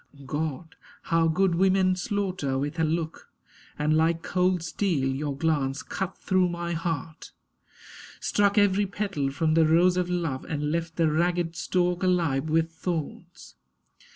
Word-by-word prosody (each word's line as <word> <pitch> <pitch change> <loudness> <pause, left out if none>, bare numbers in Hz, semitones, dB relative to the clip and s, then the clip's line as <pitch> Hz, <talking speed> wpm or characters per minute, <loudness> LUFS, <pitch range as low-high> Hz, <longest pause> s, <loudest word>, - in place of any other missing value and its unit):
God! 155 +3 -4 0.3
how 165 0 +2
good 180 +3 +2
women 185 +1 +3
slaughter 185 - -2
with 145 +4 -3
a - - +3
look! 160 0 -2 0.5
And, 150 +1 +1
like 165 +1 +2
cold 180 -1 +1
steel, 165 -7 0
your 140 +1 -2
glance 145 -3 0
cut 190 -1 -4
through 185 -1 +1
my 170 0 -3
heart, 165 -1 -4 0.9
Struck 205 0 +1
every 205 0 +3
petal 195 -8 -2
from 155 +3 0
the 160 -1 +4
rose 175 +3 +4
of 180 -1 0
love 165 -7 -2
And 150 -1 -3
left 165 0 -2
the 165 -2 +2
ragged 170 +1 0
stalk 180 +1 0
alive 165 -6 +1
with 165 +1 +1
thorns. 170 +1 -6
165 Hz, 145 wpm, -26 LUFS, 155-180 Hz, 0.9 s, the